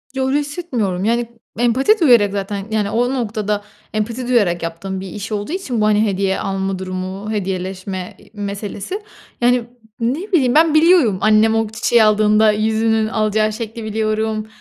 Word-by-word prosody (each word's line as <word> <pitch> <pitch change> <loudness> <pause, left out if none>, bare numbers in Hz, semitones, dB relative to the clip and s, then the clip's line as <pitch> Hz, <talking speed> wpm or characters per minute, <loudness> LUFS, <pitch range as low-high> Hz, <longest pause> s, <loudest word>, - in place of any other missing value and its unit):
Yo, 265 0 0
öyle 285 +2 +2
hissetmiyorum. 250 - -3
Yani 235 +1 +1 0.3
empati 265 - +3
duyarak 235 - +5
zaten, 200 0 -4
yani, 210 -2 0
o 245 +4 0
noktada 210 -4 -2 0.3
empati 230 +4 -2
duyarak 195 -9 +2
yaptığım 180 +3 -4
bir 190 - -7
iş 210 +3 -7
olduğu 210 +7 -3
için 265 - -2
bu, - - +3
hani, 215 +1 +3
hediye 195 -1 0
alma 195 -1 -2
durumu, 185 +3 -5
hediyeleşme 190 -1 -4
i - - -20
meselesi. 205 - -5 0.4
Yani, 245 0 +3 0.4
ne 295 - -2
bileyim 270 -7 +3
ben, 320 0 +5
biliyorum. 310 - +5
Annem 215 +1 +4
o 225 -1 +1
çiçeği 225 +1 +2
aldığında 215 0 +4
yüzünün 220 +1 +1
alacağı 215 0 0
şekli 225 0 -6
biliyorum. 215 0 -1
215 Hz, 155 wpm, -18 LUFS, 200-240 Hz, 0.4 s, duyarak